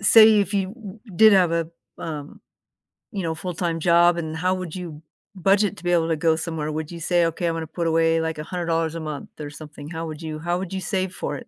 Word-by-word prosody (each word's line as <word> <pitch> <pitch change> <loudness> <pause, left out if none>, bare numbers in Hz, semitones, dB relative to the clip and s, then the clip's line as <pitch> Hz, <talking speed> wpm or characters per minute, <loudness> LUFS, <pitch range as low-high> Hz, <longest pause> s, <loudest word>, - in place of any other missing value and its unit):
say 215 +1 +7
if 200 +1 -2
you 195 -2 +1
w 215 -2 -10 0.2
did 220 -1 +8
have 180 -4 +4
a, 165 -1 0 0.3
um, 150 -3 -6 0.7
you 195 -4 -3
know, 165 -1 -1
full-time 170 -1 -3
job, 170 +1 +5
and 160 -1 -3
how 185 +2 +1
would 185 -4 -5
you 170 -5 -7 0.3
budget 195 +3 +2
to - - -13
be 175 - 0
able 165 -2 +3
to 160 - +2
go 160 0 +2
somewhere? 160 -2 -3
Would 155 +1 -4
you 170 - -7
say, 175 +1 +2
"Okay, 165 +1 -1
I'm 165 - 0
gonna 165 - -3
put 170 +1 -2
away, 165 0 +3
like, 160 -1 -2
$100 165 0 -1
a - - -3
month 155 -3 -6
or 145 -1 -5
something? 150 -1 -10
How 165 0 -4
would 155 0 -7
you 155 -1 -5
how 175 +2 -1
would 190 0 -5
you 190 - -3
save 185 0 -2
for 145 - -4
it? - - -11
165 Hz, 240 wpm, -23 LUFS, 160-185 Hz, 0.7 s, did